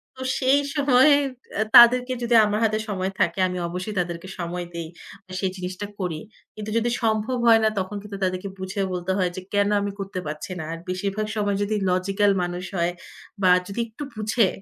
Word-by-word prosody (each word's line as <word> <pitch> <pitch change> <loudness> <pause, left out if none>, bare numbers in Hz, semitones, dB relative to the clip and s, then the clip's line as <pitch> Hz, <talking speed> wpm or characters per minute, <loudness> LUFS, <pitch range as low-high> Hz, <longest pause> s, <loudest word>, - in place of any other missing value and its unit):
তো 260 - -10 0.2
সেই 265 +2 +4 0.2
সময়, 275 -1 +5 0.5
অ্যা 215 - +2
তাদেরকে 250 +2 +8
যদি 235 0 +2
আমার 210 0 0
হাতে 215 -1 +2
সময় 190 -1 -2
থাকে, 170 +2 +1
আমি 180 - -4
অবশ্যই 185 +5 -5
তাদেরকে 170 0 -3
সময় 175 +1 -3
দেই। 170 -1 -5 0.5
সেই 190 -2 0
জিনিসটা 185 +2 -5
করি। 170 -4 -2 0.4
কিন্তু 215 0 -6
যদি 230 +1 +1
সম্ভব 220 +3 +1
হয় 225 -1 +7
না, 220 - +4
তখন 190 +2 -4
কিন্তু 205 -1 -7
তাদেরকে 185 +1 -1
বুঝিয়ে 190 +1 -2
বলতে 180 +1 -2
হয় 185 -2 +1
যে, 185 - -5
কেন 205 0 +3
আমি 200 0 -2
করতে 195 -1 -4
পারছি 150 +4 -6
না। - - -4
আর 165 - -4
বেশিরভাগ 200 +3 -2
সময় 205 -1 0
যদি 210 +1 -1
লজিক্যাল 195 +3 +2
মানুষ 175 +1 -4
হয় 170 +1 +1 0.5
বা 185 - +4 0.2
যদি 200 +4 -5
একটু 230 +6 -8
বুঝে, 215 0 +2
200 Hz, 190 wpm, -24 LUFS, 180-215 Hz, 0.5 s, তাদেরকে